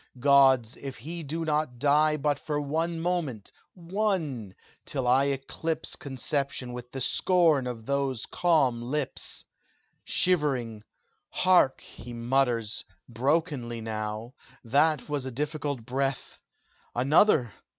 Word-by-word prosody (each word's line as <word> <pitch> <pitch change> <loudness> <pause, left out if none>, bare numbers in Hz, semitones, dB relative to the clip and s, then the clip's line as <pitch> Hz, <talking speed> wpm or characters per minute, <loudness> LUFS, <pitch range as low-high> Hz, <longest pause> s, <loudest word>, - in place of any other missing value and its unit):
Gods! 135 -3 +5
if 135 -2 -7
he 165 +8 -6
do 160 +2 -4
not 150 -5 -1
die 150 +3 +3
But 145 -1 0
for 150 -1 -2
one 165 +4 -1
moment 165 - -2 0.2
one 170 - -2 0.3
till 130 -3 -3
I 130 +3 +4
eclipse 140 +4 -2
Conception 135 -1 -3
with 125 0 -8
the 135 - -5
scorn 160 -2 +3
of 115 -3 -6
those 140 -3 -1
calm 145 -9 +2
lips! 135 +3 -4 0.6
"Shivering! 135 -11 +1 0.5
Hark! 180 -8 +3
he 120 - -11
mutters 120 -2 0 0.2
Brokenly 130 -1 -1
now 110 +1 -4 0.3
that 145 +4 +2
was 145 -3 -3
a - - -4
difficult 145 -2 -3
breath 135 +2 -2 0.6
Another? 130 - +4
140 Hz, 115 wpm, -28 LUFS, 120-155 Hz, 0.6 s, Gods